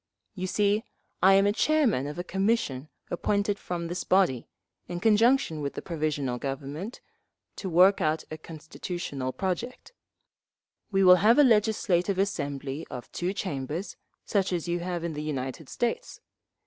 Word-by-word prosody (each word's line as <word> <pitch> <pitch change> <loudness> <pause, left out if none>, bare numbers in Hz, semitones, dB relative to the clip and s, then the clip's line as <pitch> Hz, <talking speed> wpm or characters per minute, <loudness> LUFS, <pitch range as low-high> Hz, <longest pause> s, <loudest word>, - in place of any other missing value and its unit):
You 185 -2 -4
see, 205 +3 +1 0.4
I 190 +2 +7
am 200 +1 +4
chairman 245 - +2
of 150 - -6
a 175 - -3
commission 190 - -1 0.2
appointed 200 +3 0
from 175 -1 -4
this 175 +2 -3
body, 180 -11 +2 0.4
in 175 -1 -4
conjunction 220 - +3
with 140 -1 -4
the - - -4
Provisional 150 -7 -2
Government, 140 - -5 0.6
to 190 - -4
work 185 +4 +5
out 155 +1 +1
a 155 - -5
constitutional 155 -3 -5
project…. 195 - -4 1.0
We 195 -1 +3
will 180 0 +8
have 215 +7 +5
a 295 - +8
legislative 210 -5 +2
assembly 145 -6 -2
of 125 - -8
two 175 +1 -2
chambers, 165 -2 -4 0.3
such 195 -2 0
as 175 -1 -2
you 175 0 0
have 175 -1 -3
in 170 -1 -3
the 150 - -4
United 135 -1 -4
States. 475 - -3
180 Hz, 150 wpm, -27 LUFS, 150-200 Hz, 1.0 s, will